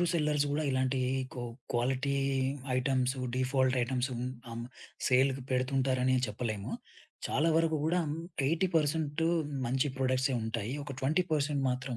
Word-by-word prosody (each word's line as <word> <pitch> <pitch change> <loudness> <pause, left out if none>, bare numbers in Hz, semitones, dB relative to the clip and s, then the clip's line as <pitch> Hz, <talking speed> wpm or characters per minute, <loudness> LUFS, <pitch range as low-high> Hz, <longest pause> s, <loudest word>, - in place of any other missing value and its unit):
అందరూ - - +3
సెల్లర్స్ 150 -3 +2
గూడా 150 +2 0
ఇలాంటి 130 0 +1 0.4
కో 125 - -5 0.3
క్వాలిటీ 130 +3 +1 0.6
ఐటెమ్స్ 130 0 +1 0.2
డిఫాల్ట్ 130 0 +2
ఐటెమ్సు 130 +1 0 0.4
అం 115 - -5 0.5
సేల్‌కి 130 +1 +3
పెడుతుంటారని 130 0 +2
చెప్పలేము. 105 -2 -3 0.6
చాలా 155 +4 +2
వరకు 165 -1 +3
కూడా 175 +3 +2 0.5
80% 160 -1 +1 0.4
మంచి 130 +4 +1
ప్రొడక్ట్సే 130 0 +1
ఉంటాయి. 110 +1 -3
ఒక 140 -1 -6
20% 150 -1 +1
మాత్రం 125 0 -3
135 Hz, 115 wpm, -31 LUFS, 130-150 Hz, 0.6 s, అందరూ